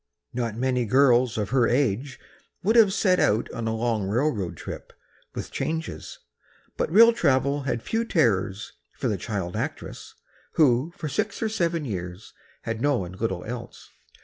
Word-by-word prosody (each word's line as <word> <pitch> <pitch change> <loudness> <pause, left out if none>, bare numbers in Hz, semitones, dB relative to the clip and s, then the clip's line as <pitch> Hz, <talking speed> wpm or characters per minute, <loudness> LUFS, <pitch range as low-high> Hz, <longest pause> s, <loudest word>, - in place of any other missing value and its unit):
Not 115 -3 -2
many 125 -1 0
girls 125 0 +4
of 105 -1 -2
her 125 -3 +3
age 130 +1 0 0.4
would 220 +5 +2
have 220 -4 +7
set 190 -2 +2
out 110 +3 +2
on 115 -1 -4
a 110 - -1
long 110 -3 -1
railroad 105 - -1
trip, - - -8 0.4
with - - -5
changes, 160 +1 -4 0.6
but - - -2
rail 230 +5 +8
travel 140 - +1
had 120 -1 -2
few 225 +1 -1
terrors 110 - 0 0.2
for - - -3
the 105 - 0
child 95 -2 -4
actress, - - -5 0.4
who 140 +1 +3
for 160 - -4
six 200 +8 -2
or 220 - +1
seven 170 -6 -1
years 90 -2 -6 0.3
had 115 -1 -4
known 125 -11 0
little 95 -2 -3
else. 120 +1 -8
125 Hz, 155 wpm, -25 LUFS, 110-155 Hz, 0.6 s, rail